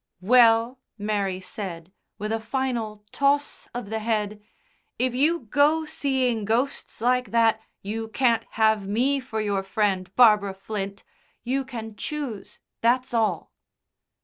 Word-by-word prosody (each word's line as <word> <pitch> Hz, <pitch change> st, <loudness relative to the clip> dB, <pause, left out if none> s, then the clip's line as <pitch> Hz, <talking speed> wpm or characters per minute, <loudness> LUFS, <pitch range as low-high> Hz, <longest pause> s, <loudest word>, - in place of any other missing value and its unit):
"Well," 230 Hz, +3 st, +5 dB, 0.2 s
Mary 200 Hz, -3 st, -1 dB
said, 185 Hz, -2 st, -7 dB, 0.2 s
with 210 Hz, +1 st, -4 dB
a 225 Hz, -, 0 dB
final 225 Hz, -4 st, -3 dB
toss 285 Hz, +1 st, +1 dB
of 240 Hz, -4 st, -6 dB
the 220 Hz, -, -1 dB
head, 215 Hz, -2 st, -1 dB, 0.6 s
"if 255 Hz, +1 st, 0 dB
you 310 Hz, +7 st, +2 dB
go 290 Hz, +7 st, +2 dB
seeing 260 Hz, -7 st, 0 dB
ghosts 230 Hz, +3 st, -1 dB
like 250 Hz, +1 st, +2 dB
that 225 Hz, -1 st, +3 dB, 0.2 s
you 220 Hz, +3 st, -4 dB
can't 230 Hz, -1 st, +2 dB
have 220 Hz, -3 st, +2 dB
me 255 Hz, +7 st, +1 dB
for 225 Hz, -4 st, -5 dB
your 205 Hz, -2 st, 0 dB
friend, 195 Hz, -2 st, 0 dB
Barbara 210 Hz, -5 st, +5 dB
Flint 195 Hz, 0 st, -5 dB, 0.4 s
you 265 Hz, +3 st, 0 dB
can 225 Hz, -4 st, -7 dB
choose, 260 Hz, -7 st, -5 dB, 0.2 s
that's 245 Hz, +2 st, +2 dB
all." 215 Hz, -8 st, 0 dB
225 Hz, 130 wpm, -25 LUFS, 210-255 Hz, 0.6 s, Well